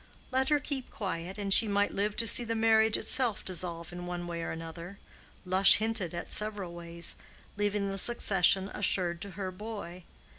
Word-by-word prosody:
Let 265 +1 +1
her 295 -1 +3
keep 280 -3 -4
quiet, 185 -2 -5
and 200 -1 0
she 225 - +6
might 205 0 +1
live 205 +1 -1
to 230 - +1
see 235 +2 +4
the 230 -1 -3
marriage 220 -1 +3
dissolve 235 -1 -1
itself 175 -2 -4
in 175 0 -7
one 175 0 -5
way 170 -1 -5
or - - -4
other—Lush 180 +3 +1
hinted 215 -6 -1
at 170 - -6
several 210 -4 -4
ways—leaving 195 +4 -4
the 195 - -4
succession 195 -4 +3
assured 180 -3 +1
to 200 - -5
her 190 -2 -4
boy. 185 -3 -8
195 Hz, 170 wpm, -30 LUFS, 175-220 Hz, -, she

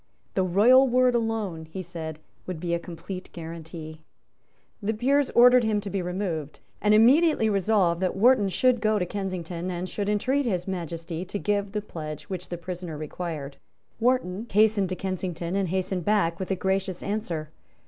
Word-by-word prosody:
The 190 - +1
royal 220 +9 +5
word 250 0 +3
alone, 220 -8 -1
he 185 +4 -7
said, 160 -3 -6 0.3
would 180 -3 -4
be 170 0 -2
a 170 - +1
complete 180 +2 -8
guarantee. 160 -1 -8 0.8
The 215 +2 -1
Peers 275 +4 +2
ordered 245 +1 +7
him 215 -2 +1
to 200 -1 -6
be 195 - -1
removed, 175 -5 -3 0.2
and 210 0 +4
immediately 250 +1 +5
resolved 195 -4 +2
that 185 - 0
Wharton 210 -1 +4
should 250 +4 +2
go 215 0 +2
to 180 - 0
Kensington, 180 -2 -4
and 180 0 -3
should 205 +1 -3
entreat 260 +6 +1
His 180 -4 -1
Majesty 170 -2 -4
to 190 - -4
give 200 -1 -1
the 210 -1 -2
pledge 155 -6 -7
which 185 -1 -5
the 175 - -4
prisoner 175 -2 -6
required. 155 -2 -5 0.4
Wharton 235 -4 +1
hastened 210 -2 +3
to 185 - -2
Kensington, 180 -2 -3
and 195 -3 0
hastened 185 0 -1
back 170 -4 +1
with 190 - -4
a 190 - +1
gracious 190 -1 -1
answer. 180 -7 -3
190 Hz, 170 wpm, -26 LUFS, 170-215 Hz, 0.8 s, ordered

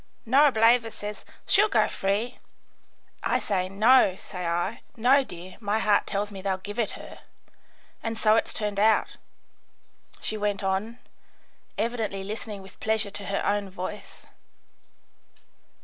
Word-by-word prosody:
Norableva 235 -3 +5
says, 210 -1 -7 0.2
'She'll 420 +2 +4
go - - +3
free.' 205 +6 -1 0.8
I - - +1
say, 185 -2 -1
'No,' 215 0 +5
say 180 -2 -6
I. 175 +6 -1 0.2
'No, 260 +5 +5
dear, 180 -4 -10
my 210 -1 0
heart 210 -2 +2
tells 205 +1 -2
me 195 -1 -8
they'll 190 -1 -1
give 205 +4 -7
it 220 -3 0
her.' - - -10 0.8
And 225 0 -3
so 215 -1 +4
it's - - +1
turned 210 -2 -3
out," 220 +1 +3 1.0
she 215 - -2
went 205 -1 -1
on, 195 +5 -1 0.8
evidently 220 -4 -2
listening 210 0 -6
with 190 - -15
pleasure 220 -2 0
to 200 -1 -7
her 200 - -1
own 205 -1 0
voice. 185 +2 -8
210 Hz, 135 wpm, -26 LUFS, 195-225 Hz, 1.0 s, Norableva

